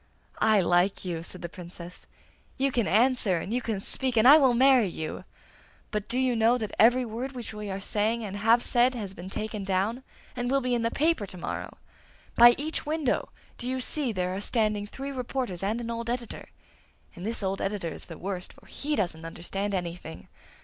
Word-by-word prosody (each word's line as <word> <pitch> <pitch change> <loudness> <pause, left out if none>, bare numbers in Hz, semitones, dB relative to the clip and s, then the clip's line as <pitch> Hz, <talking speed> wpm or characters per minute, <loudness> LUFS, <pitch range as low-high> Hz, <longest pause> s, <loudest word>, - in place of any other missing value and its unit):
'I 215 -2 +4
like 180 +3 +2
you!' 170 -3 -3
said 180 +2 -10
the - - -2
Princess. 175 0 -10 0.5
'You 275 +1 +1
can 235 -3 +1
answer, 225 -3 +3
and 190 +6 -4
you 250 - 0
can 220 -4 -2
speak, 255 +4 0
and 220 +3 +6
I 295 +3 +10
will 260 -4 +4
marry 260 -3 +5
you; 160 -3 -5 0.7
but 210 -2 -2
do 245 - -1
you 255 -2 +2
know 230 +2 +4
that 215 -4 -4
every 245 +3 +5
word 240 +4 -5
which 245 -3 -7
we 210 -1 -6
are 190 0 -3
saying 220 +3 0
and 205 -1 -5
have 225 +3 +4
said 250 +1 +3
has 205 -5 -5
been 185 0 -9
taken 215 0 -4
down 195 +6 0 0.3
and 245 0 -2
will 275 +1 +3
be 250 -2 -1
in 240 - +1
the 230 - +1
paper 305 -6 +1
to 185 - -9
morrow? - - -5 0.6
By 240 +1 +8
each 310 +3 -2
window 305 -3 -1 0.3
do 245 - -5
you 260 0 -1
see 265 0 0
there 185 -2 -2
are 195 - -4
standing 210 -2 0
three 275 +6 -6
reporters 250 -7 -3
and 210 +4 -1
an 235 -1 -4
old 230 0 -4
editor, 240 -1 -4 0.7
and 175 - -9
this 225 +1 0
old 195 0 -1
editor 195 -4 -2
is - - -10
the 165 - -9
worst, 185 -1 -5
for - - -20
he 295 +1 -2
doesn't 170 - -1
understand 195 +5 -4
anything! 170 - -6
220 Hz, 205 wpm, -27 LUFS, 190-250 Hz, 0.7 s, I